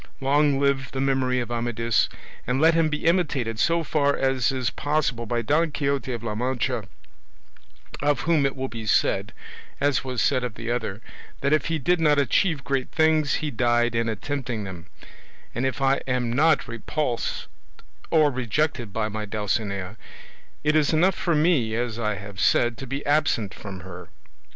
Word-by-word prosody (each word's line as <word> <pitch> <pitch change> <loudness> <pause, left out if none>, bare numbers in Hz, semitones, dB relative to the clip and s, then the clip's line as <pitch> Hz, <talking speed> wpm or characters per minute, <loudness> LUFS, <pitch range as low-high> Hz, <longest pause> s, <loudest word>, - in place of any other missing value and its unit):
Long 140 +1 +3
live 140 -1 +1
the 135 - -3
memory 130 -2 +1
of 120 -1 -5
Amadis 115 -1 0 0.4
and 125 +2 +1
let 160 +2 +5
him 165 -1 +3
be 150 0 -3
imitated 140 -10 +1
so 170 +4 +2
far 145 -2 +1
as 135 0 +1
is 130 -1 -1
possible 140 -6 -1
by 120 +1 -1
Don 160 +7 +2
Quixote 140 -3 -1
of 120 -2 -5
La 110 -2 -2
Mancha, 125 0 -1 1.2
of 145 0 +1
whom 160 -3 +2
it 135 -1 0
will 130 0 -3
be 115 -3 -7
said, - - +2 0.5
as 140 -1 +1
was 130 -2 -3
said 130 0 +2
of 120 -4 -4
the 115 +1 -4
other, 115 -3 -3 0.4
that 140 +2 +2
if 155 - +2
he 165 -1 0
did 175 +4 +1
not 150 -2 +4
achieve 145 +2 +2
great 135 0 -1
things, 155 -3 +2
he 150 - -2
died 120 -1 +2
in 115 0 0
attempting 120 0 -3
them; 90 -3 -8 0.7
and 125 +3 0
if 135 +1 -3
I 135 0 +4
am 125 -2 0
not 155 +5 +3
repulsed 120 +2 -3 0.6
or 155 -3 +4
rejected 130 -1 -1
by 110 +2 -1
my 110 0 -4
Dulcinea, 100 -1 -2 0.7
it 150 +1 +2
is 155 -2 +3
enough 180 +5 +4
for 170 -1 0
me, 150 -9 +2
as 120 -1 -2
I 105 -2 0
have 100 0 -9
said, 120 +4 +3
to 135 - -7
be 140 +3 -4
absent 145 -9 +1
from 95 -3 -8
her. 90 0 -10
130 Hz, 175 wpm, -24 LUFS, 115-145 Hz, 1.2 s, let